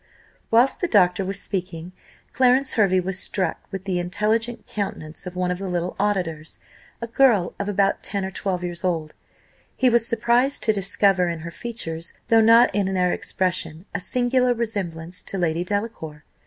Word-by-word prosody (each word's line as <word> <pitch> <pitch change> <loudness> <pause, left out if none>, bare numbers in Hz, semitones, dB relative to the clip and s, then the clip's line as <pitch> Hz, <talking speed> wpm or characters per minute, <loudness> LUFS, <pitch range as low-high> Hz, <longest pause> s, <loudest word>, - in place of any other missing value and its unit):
Whilst 240 +4 +3
the 355 - +1
doctor 195 - +3
was 195 +1 -3
speaking, 180 -3 -5 0.4
Clarence 260 +1 +3
Hervey 195 -4 +3
was 185 +1 -3
struck 185 -5 -1
with 195 -2 -5
the 185 -2 -1
intelligent 215 +6 -1
countenance 185 -4 -5
of 180 - -7
one 180 0 0
of 180 - -3
the 195 - -4
little 180 0 -2
auditors, 175 -6 -2 0.5
a - - 0
girl 230 -6 +3
of 200 0 -2
about 200 -1 +1
ten 200 -1 -2
or 190 - -5
twelve 185 -2 -3
years 175 0 -3
old; 165 -4 -1 0.6
he 255 -1 +3
was 235 -1 +3
surprised 240 +4 +1
to 220 - +4
discover 195 -2 +2
in 165 -1 -4
her 170 +1 -7
features, 170 -7 -4
though 225 -1 +6
not 230 +2 +6
in 195 -2 0
their 180 -1 +2
expression, 180 -2 -2
a 200 - -1
singular 250 +4 +1
resemblance 185 -7 -4
to 195 - -5
Lady 170 -1 0
Delacour. 180 -7 -4
195 Hz, 170 wpm, -23 LUFS, 175-225 Hz, 0.6 s, though